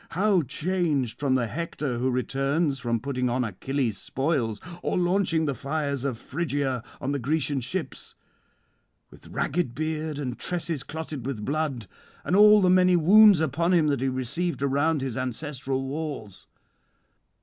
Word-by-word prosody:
how 195 -2 +3
changed 150 -3 -1
from 140 -2 +1
the 125 -2 +1
Hector 145 -1 -3
who 130 +2 +1
returns 135 +3 0
from 120 -3 -1
putting 125 -1 -2
on 125 +1 0
Achilles' 120 +2 -2
spoils, 135 -7 -1 0.2
or - - -1
launching 175 -2 +1
the 140 - 0
fires 140 +1 -3
of 135 -4 -2
Phrygia 140 -3 -2 0.2
on 135 - -2
the 140 - -1
Grecian 145 +1 0
ships! 160 +8 -5 1.0
with - - -15
ragged 145 -6 -2
beard 155 0 -3
and 125 -4 -4
tresses 170 -5 -1
clotted 155 -2 -6
with 110 -7 -4
blood, 145 -6 -2 0.4
and 175 - 0
all 210 +1 +7
the - - +4
many 185 -1 +5
wounds 195 +2 +7
upon 170 +4 +1
him 155 -3 +3
that 140 -3 0
he 135 - +1
received 135 +6 -2
around 145 +2 +1
his 130 -3 -3
ancestral 135 +1 -3
walls. 140 - -6
140 Hz, 150 wpm, -26 LUFS, 130-165 Hz, 1.0 s, all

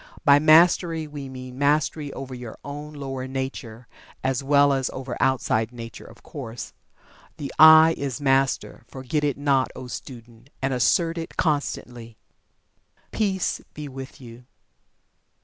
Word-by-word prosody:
By 140 0 +7
Mastery, 165 +1 +4
we 145 -2 -8
mean 130 0 -9
mastery 145 0 +1
over 135 -1 -7
your 125 -3 -8
own 145 +1 -7
lower 135 -3 -5
nature, 130 -3 -6 0.4
as 130 0 -1
well 140 0 +4
as 135 -1 -1
over 130 -2 -6
outside 115 -3 +1
nature, 115 -2 -9
of 115 - -16
course. 120 -5 -8 0.6
The 140 - -6
"I" 160 +1 +9
is 135 -4 -3
Master 135 -1 0
forget 135 +3 -3
it 145 -3 0
not, 140 -2 +1
O - - -8
student, 120 -1 -10
and 135 0 -1
assert 165 +7 +2
it 165 - -8
constantly. 120 -7 -2 0.9
Peace 195 -4 -1
be 150 -1 -6
with 135 +1 -9
you. 120 -1 -13
135 Hz, 135 wpm, -24 LUFS, 125-150 Hz, 0.9 s, I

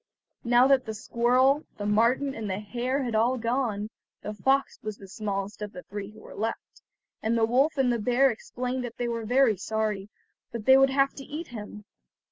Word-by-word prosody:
Now 240 +1 +5
that 270 -1 +4
the 220 - -4
squirrel, 255 +6 +2
the 205 - -4
marten, 235 +7 +2
and 220 -4 -5
the 190 - -1
hare 250 +6 -2
had 240 -3 -3
all 235 +4 +2
gone, 230 -3 -1 0.3
the 210 - -4
fox 270 +5 +1
was 215 -1 -5
the 195 - -12
smallest 200 +1 -4
of 210 0 -5
the 180 - -9
three 205 0 -6
who 215 +1 -15
were - - -12
left, 225 +2 -5 0.4
and 230 +1 +1
the 225 - +4
wolf 270 +7 +2
and 255 -3 +3
the 235 - -1
bear 250 +5 +3
explained 250 +3 -4
that 240 -1 -7
they 240 - -1
were 230 -1 -3
very 245 -2 +3
sorry, 210 0 -2 0.4
but 230 -3 -6
they 265 - +8
would 270 0 +6
have 275 0 +2
to 275 - -7
eat 310 +5 -7
him. 210 -3 -8
235 Hz, 205 wpm, -27 LUFS, 210-260 Hz, 0.4 s, they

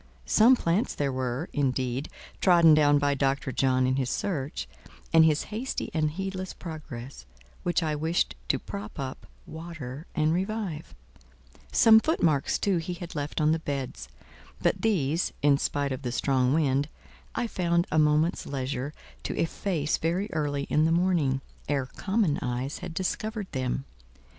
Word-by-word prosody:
Some 235 +4 +6
plants 185 +1 0
there 140 -2 0
were, 130 +4 -2
indeed, 130 -1 -1 0.3
trodden 170 -4 +7
down 145 -1 +5
by 145 0 +2
Dr. 135 0 0
John 130 0 +2
in 130 +1 +1
his 130 -2 0
search, 150 -4 -2 0.5
and 165 0 +8
his 155 -1 +3
hasty 245 +5 -3
and 155 -2 +1
heedless 190 +2 -4
progress, 140 - -8 0.3
which 175 0 +1
I 155 -1 0
wished 160 +3 0
to - - +2
prop 105 +1 -7
up, 130 -1 -5 0.2
water, 160 -4 -8
and 155 -1 +2
revive; 185 - -3 0.8
some 220 -1 +7
footmarks, 170 - +1
too, 195 -3 +1
he 175 +2 -3
had 175 -1 -8
left 145 0 -3
on 155 0 +3
the 160 - +1
beds: 135 - -4 0.5
but - - +1
these, 170 -7 +1
in 140 -1 +5
spite 140 -1 -1
of 130 - -3
the 125 -3 -3
strong 130 0 +2
wind, 145 -1 +2 0.5
I - - 0
found 170 -5 +1
a 155 - +3
moment's 150 +3 +2
leisure 135 +1 -3 0.3
to - - -4
efface 165 -2 0
very 180 +6 -1
early 145 -2 -1
in 150 +2 +2
the 165 - +2
morning, 165 -6 +2 0.3
ere 140 -3 +1
common 190 - 0
eyes 125 +1 -3
had 165 - -7
discovered 210 +2 -3
them. 130 0 -2
150 Hz, 155 wpm, -27 LUFS, 135-175 Hz, 0.8 s, and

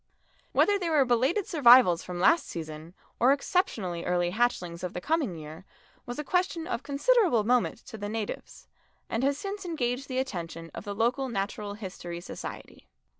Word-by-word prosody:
Whether 405 -1 +3
they 350 -3 -1
were 300 -4 +4
belated 260 - +2
survivals 245 - +6
from 180 -1 -6
last 325 - +4
season 160 +1 -7 0.2
or 250 +3 +5
exceptionally 215 - 0
early 175 -1 +1
hatchings 180 -6 -1
of 180 - -3
the - - -3
coming 295 - 0
year, 155 +2 -9 0.4
was 245 - -5
a 300 - -3
question 355 0 0
of 370 - -3
considerable 300 - +3
moment 245 +2 +2
to 220 - -9
the 205 0 -4
natives, 215 -1 -5 0.4
and 230 +3 0
has 280 +1 +2
since 400 +4 -5
engaged 270 -6 -2
the 255 - -4
attention 165 -9 -4
of - - -8
the 205 -1 -4
local 245 +5 +1
Natural 205 -1 -3
History 185 -4 -7
Society. 175 - -9
235 Hz, 170 wpm, -28 LUFS, 180-285 Hz, 0.4 s, survivals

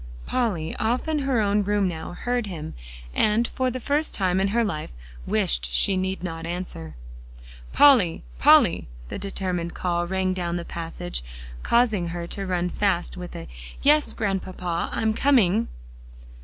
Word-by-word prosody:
Polly, 195 -11 -1
off 235 +7 0
in 310 -1 0
her 270 -5 +1
own 205 0 +2
room 205 -1 +1
now, 170 -1 -5
heard 245 +3 -2
him, 160 -5 -6 0.4
and 220 +2 +2
for 260 0 0
the 255 +1 -4
first 290 +5 0
time 185 -1 +1
in 195 - +2
her 230 +4 +2
life, 155 -8 -3 0.4
wished - - +2
she 190 - +3
need 190 0 -2
not 165 -2 -5
answer. 170 - -5 0.8
"Polly 240 - +5 0.2
Polly!" - - +5 0.2
the - - -5
determined 180 -4 -3
call 175 -1 -1
rang 190 0 0
down 175 -2 -2
the 170 -1 -4
passage, 90 - -5 0.4
causing 220 -7 +2
her 170 0 -4
to 195 +3 -4
run 180 -1 0
fast 195 -4 0
with 180 -1 -8
a 85 - -7 0.4
"Yes, 295 +1 +4
Grandpapa, 185 -4 -2
I'm 220 -1 0
coming." 230 -5 +3
190 Hz, 155 wpm, -24 LUFS, 175-225 Hz, 0.8 s, Polly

